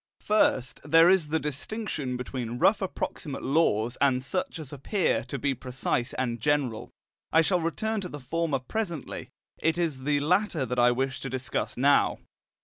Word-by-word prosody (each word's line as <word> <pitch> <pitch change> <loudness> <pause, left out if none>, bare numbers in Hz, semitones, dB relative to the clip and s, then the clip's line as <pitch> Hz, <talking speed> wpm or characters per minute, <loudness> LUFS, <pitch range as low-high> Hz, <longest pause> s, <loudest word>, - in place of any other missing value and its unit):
First, 130 - +1
there 165 +3 +6
is 185 -5 +4
the 160 +2 0
distinction 150 - -3
between 125 -2 -4
rough 200 - +4
approximate 160 -6 -4
laws 120 -6 +2
and 130 -2 +3
such 180 +5 -3
as 150 -3 -8
appear 170 +7 0
to 140 - -4
be 140 0 0
precise 125 0 -2
and 120 -3 -2
general. 140 -5 0 0.4
I 160 - +6
shall 180 +2 +2
return 215 +6 -1
to 180 - -5
the 145 - -7
former 155 +3 -1
presently; 170 - -4 0.3
it 165 +1 +1
is 165 -6 -1
the 145 +2 +1
latter 175 -1 +1
that 125 -1 -2
I 120 0 +6
wish 130 +2 -1
to 135 - -5
discuss 130 0 -3
now. 140 +3 +4
145 Hz, 165 wpm, -27 LUFS, 130-170 Hz, 0.4 s, there